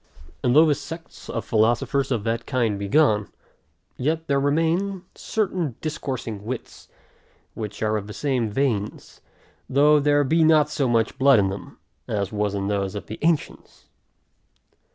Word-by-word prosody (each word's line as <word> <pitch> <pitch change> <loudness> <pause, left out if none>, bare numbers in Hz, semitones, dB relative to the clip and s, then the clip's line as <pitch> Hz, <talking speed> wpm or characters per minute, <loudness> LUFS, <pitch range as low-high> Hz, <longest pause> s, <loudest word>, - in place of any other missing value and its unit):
And 125 0 +2
though 155 +2 +8
the 155 - +3
sects 165 +3 -9
of 115 - -3
philosophers 120 +5 +1
of 120 -6 -1
that 115 +1 -2
kind 115 -5 0
be 100 - -3
gone, 110 -5 +3 0.7
yet 160 +5 -1
there 140 -3 +1
remain 165 +7 0
certain 185 - -2
discoursing 130 -9 -4
wits, 120 +2 -7 0.7
which 105 -1 -6
are 110 0 +1
of 105 -1 -6
the 105 - -8
same 130 -5 -1
veins, 110 -4 -2 0.5
though 150 +3 +5
there 145 0 +3
be 160 +4 +3
not 155 -1 +4
so 135 - 0
much 115 -1 0
blood 135 -1 +6
in 100 -2 +2
them, 100 +1 -8 0.3
as 100 -2 -2
was 105 -1 -1
in 100 -1 -2
those 100 -1 -1
of 100 -4 -5
the 110 - -8
ancients. 165 -1 -2
130 Hz, 155 wpm, -23 LUFS, 105-150 Hz, 0.7 s, though